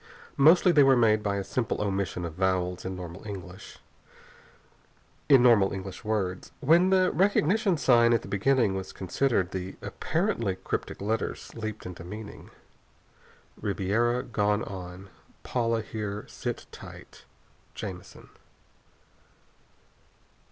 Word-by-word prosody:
Mostly 170 +6 +6
they 150 -4 +5
are 135 -1 +6
made 110 -2 +4
by 100 -1 -1
a 100 - -2
simple 115 +3 -2
omission 95 -3 -2
of 85 - -6
vowels 90 0 -1
in 95 0 -4
normal 90 -1 -8
English 95 -2 -9 2.3
words. 100 -4 -2
And 130 - -9
when 170 +4 +6
the 185 -1 +3
recognition 195 +1 +2
sign 120 -4 +4
at 115 - +2
the - - -9
beginning 115 +1 +2
was 95 -1 -5
considered, 95 -1 0
the 95 0 -5
apparently 160 - -1
cryptic 95 - -5
letters 110 +2 -3
leaped 110 -2 -6
into 90 -2 -8
meaning. 105 +4 -9 1.1
"RiBeRA 110 +5 0
GoNe 105 -1 +1
ON 90 0 -8 0.3
PauLA 115 -2 0
HeRe 105 -1 -5
SiT - - -5
TiGhT - - -12 0.5
Jamison." 95 -4 -8
105 Hz, 115 wpm, -27 LUFS, 95-125 Hz, 2.3 s, Mostly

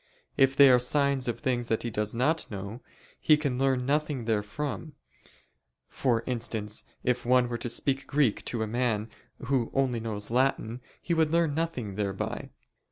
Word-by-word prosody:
If 135 0 +4
they 140 -1 +8
are 125 - +6
signs 140 +1 +1
of 120 - -2
things 125 -4 -1
that 110 -1 0
he 120 - -3
does 105 0 -1
not 150 +7 0
know, 100 +4 -6 0.4
he 155 - +5
can 140 -4 -2
learn 135 -2 +1
nothing 145 -3 0
therefrom: 115 +8 -3 0.9
for 120 -4 0
instance, 110 -4 -3 0.2
if 125 0 0
one 125 0 +4
were 120 -1 -4
to 120 - -3
speak 135 +3 0
Greek 140 -6 +1
to 115 -2 -2
a - - -3
man 115 -2 -1 0.3
who 125 -3 +1
only 130 -3 +1
knows 110 -2 -3
Latin, 125 -2 0 0.2
he 170 - 0
would 160 -2 +3
learn 165 -2 +2
nothing 145 -10 -2
thereby. 100 -2 -3
125 Hz, 165 wpm, -28 LUFS, 115-140 Hz, 0.9 s, they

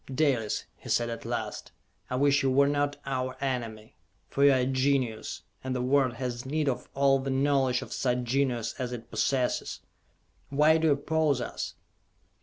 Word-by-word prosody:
"Dalis," 130 -6 +1
he - - -11
said 120 0 +1
at 115 - -6
last, - - -4 0.4
"I 125 - -2
wish 140 +1 +3
you 135 - +2
were 140 +2 +4
not 145 0 0
our 130 -1 -2
enemy! 115 -4 -4 0.3
For 140 - +1
you 140 - +8
are 130 -1 +3
a - - +1
genius, 130 -3 0 0.2
and 130 0 -2
the 125 - -1
world 130 -1 +3
has 120 0 -4
need 150 +3 -1
of 130 - -2
all 135 0 +4
the 135 +1 -4
knowledge 135 -2 +2
of - - -8
such 125 -1 0
genius 120 -2 0
as 125 -1 -3
it 115 -1 -8
possesses. 130 -2 0 0.7
Why 150 +3 +4
do 160 - +2
you 150 - +5
oppose 150 -1 +1
us?" - - -5
130 Hz, 180 wpm, -28 LUFS, 125-140 Hz, 0.7 s, you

